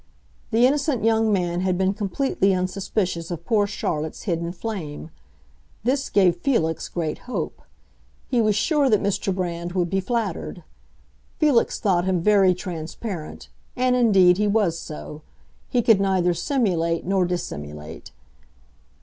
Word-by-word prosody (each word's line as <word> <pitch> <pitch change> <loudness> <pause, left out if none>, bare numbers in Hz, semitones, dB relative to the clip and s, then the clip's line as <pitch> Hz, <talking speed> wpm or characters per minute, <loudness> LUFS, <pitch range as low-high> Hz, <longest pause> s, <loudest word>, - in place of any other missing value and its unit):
The 230 +3 +4
innocent 280 -3 +1
young 225 -1 +3
man 175 -3 0
had 185 -1 0
been 190 +1 +1
completely 200 -1 0
unsuspicious 185 -2 -2
of 170 -1 -6
poor 210 -3 +2
Charlotte's 155 -6 -3
hidden 170 -3 -2
flame. 175 -6 -6 0.7
This 270 +4 0
gave 180 -4 +3
Felix 170 - 0
great 160 -3 -3
hope; - - -4 0.7
he 245 -3 +2
was 215 -2 +2
sure 290 +4 +2
that 215 -3 +4
Mr. 200 -1 -1
Brand 175 -2 -3
would 175 -2 0
be 195 - +1
flattered. 195 -5 -3 0.7
Felix 290 -7 +2
thought 185 -4 +1
him 190 -2 +1
very 195 0 +4
transparent, 170 0 -6 0.3
and 250 0 +2
indeed 195 -7 +5
he 210 - +2
was 200 -6 +1
so; 150 -1 -8 0.5
he 245 -2 +1
could 215 -4 +5
neither 185 -2 +2
simulate 170 - 0
nor 190 0 +2
dissimulate. 75 - -5
190 Hz, 135 wpm, -23 LUFS, 170-220 Hz, 0.7 s, indeed